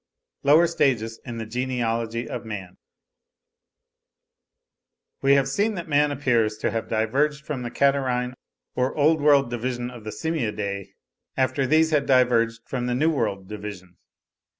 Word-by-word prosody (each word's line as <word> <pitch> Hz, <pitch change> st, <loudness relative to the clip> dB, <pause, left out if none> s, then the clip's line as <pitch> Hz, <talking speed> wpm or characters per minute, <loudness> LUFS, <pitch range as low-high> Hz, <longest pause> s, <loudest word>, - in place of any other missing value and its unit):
LOWER 150 Hz, +4 st, +6 dB
STAGES 120 Hz, -9 st, 0 dB
IN 120 Hz, -2 st, -6 dB
THE 115 Hz, -, -4 dB
GENEALOGY 115 Hz, -1 st, -2 dB
OF -, -, -5 dB
MAN. 100 Hz, -5 st, -7 dB, 2.4 s
We 135 Hz, 0 st, +4 dB
have 140 Hz, -1 st, +3 dB
seen 205 Hz, +10 st, 0 dB
that 170 Hz, -2 st, -5 dB
man 150 Hz, -1 st, +3 dB
appears 120 Hz, -6 st, +1 dB
to -, -, -1 dB
have 115 Hz, -1 st, -3 dB
diverged 140 Hz, +8 st, 0 dB
from 145 Hz, -4 st, -4 dB
the 120 Hz, -, -4 dB
Catarrhine 130 Hz, -2 st, +1 dB, 0.4 s
or 125 Hz, +1 st, -1 dB
Old 155 Hz, +1 st, +3 dB
World 140 Hz, -4 st, +4 dB
division 120 Hz, +1 st, -3 dB
of 120 Hz, -3 st, -11 dB
the 110 Hz, -, -6 dB
Simiadae, 105 Hz, -, -3 dB, 0.4 s
after 130 Hz, +1 st, +1 dB
these 160 Hz, +3 st, +3 dB
had 145 Hz, -2 st, +1 dB
diverged 120 Hz, -3 st, +3 dB
from 125 Hz, -2 st, -3 dB
the 125 Hz, -, 0 dB
New 155 Hz, +6 st, +2 dB
World 105 Hz, -9 st, -2 dB
division. 100 Hz, -4 st, -8 dB
125 Hz, 145 wpm, -24 LUFS, 115-140 Hz, 2.4 s, LOWER